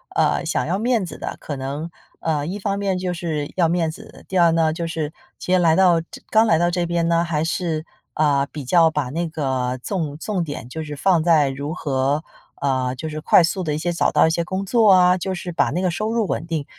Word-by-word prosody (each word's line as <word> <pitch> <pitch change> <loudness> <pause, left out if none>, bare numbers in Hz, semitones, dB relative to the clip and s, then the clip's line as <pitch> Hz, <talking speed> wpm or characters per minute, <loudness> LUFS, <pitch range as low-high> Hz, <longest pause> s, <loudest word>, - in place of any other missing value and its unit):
呃， - - +2
想 - - -1
要 180 +4 0
面 230 -3 +1
子 160 - -8
的， - - -6
可 145 - -5
能， 140 +5 -5 0.3
呃， 150 -3 -1
一 190 +6 -4
方 200 0 -1
面 195 -2 -1
就 180 -1 -2
是 160 -4 -3
要 170 -3 +3
面 170 -1 +1
子， 220 +7 -12
第 190 - -2
儿 170 -2 +5
呢 160 -1 +2
就 170 +1 -3
是 160 -1 -3 0.3
其 185 - -1
实 - - +6
来 165 -2 +4
到 175 -3 +4
这 165 - -13
刚 220 +1 +5
来 165 - +4
到 175 0 +2
这 175 0 0
边 170 -1 0
呢 170 0 +2
还 160 -3 -1
是， 165 -2 -2 0.3
呃， 140 -2 +2
比 145 -4 -7
较 165 +3 +4
把 150 -5 -2
那 165 +4 -2
个 130 -5 -2
重 160 -7 -3
重 185 +2 -2
点 145 -6 -6
就 160 +3 -5
是 150 -1 -6
放 170 +1 +3
在 155 -4 +4
如 140 +3 -4
何 140 -1 -1 0.4
呃， 130 -2 0
就 160 +5 -5
是 155 0 -5
快 - - +5
速 185 +2 -1
地 150 - -1
一 - - -2
些 175 +2 -2
找 170 - +1
到 - - +4
一 - - +2
些 170 +1 0
工 190 +3 -3
作 220 0 +4
啊， 180 -1 +5
就 190 +1 -3
是 175 0 -6
把 165 - +1
那 180 - -1
个 185 - +1
收 215 +5 -2
入 225 -4 0
稳 160 - -2
定。 160 -4 -2
165 Hz, 265 characters per minute, -21 LUFS, 150-180 Hz, 0.4 s, 实